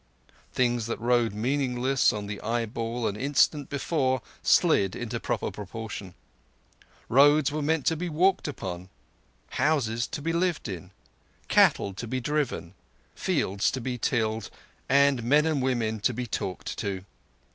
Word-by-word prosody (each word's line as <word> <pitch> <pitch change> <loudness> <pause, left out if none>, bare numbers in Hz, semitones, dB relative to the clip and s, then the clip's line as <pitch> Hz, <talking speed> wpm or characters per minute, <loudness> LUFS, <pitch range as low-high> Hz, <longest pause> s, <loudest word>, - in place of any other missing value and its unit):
Things 120 -3 +1
that 115 - -3
rode 120 -1 +2
meaningless 130 +2 +1
on 105 -1 -4
the 100 0 -6
eyeball 115 0 -2
an 100 - -2
instant 140 +3 +2
before 135 -3 0 0.2
slid 95 -2 +3
into 120 -2 -4
proper - - -2
proportion. 105 -2 -7 0.9
Roads 145 +3 +5
were 155 +1 -2
meant 155 0 0
to 160 - +3
be 175 +2 -3
walked 180 +3 +2
upon, 95 -9 -6 0.7
houses 125 -6 +1
to - - -5
be 165 +3 -2
lived 170 -3 0
in, 90 -2 -6 0.6
cattle 100 - +4
to 115 +5 -6
be 130 +3 -2
driven, 135 - -2 0.4
fields 100 +2 0
to 130 - -3
be 125 0 -4
tilled, 110 -4 0 0.4
and 140 -1 +4
men 145 +6 +3
and 155 -4 +1
women 115 -4 0
to 120 +3 0
be 125 +1 -3
talked 95 -4 -4
to. 95 -3 -3
125 Hz, 145 wpm, -27 LUFS, 110-145 Hz, 0.9 s, Roads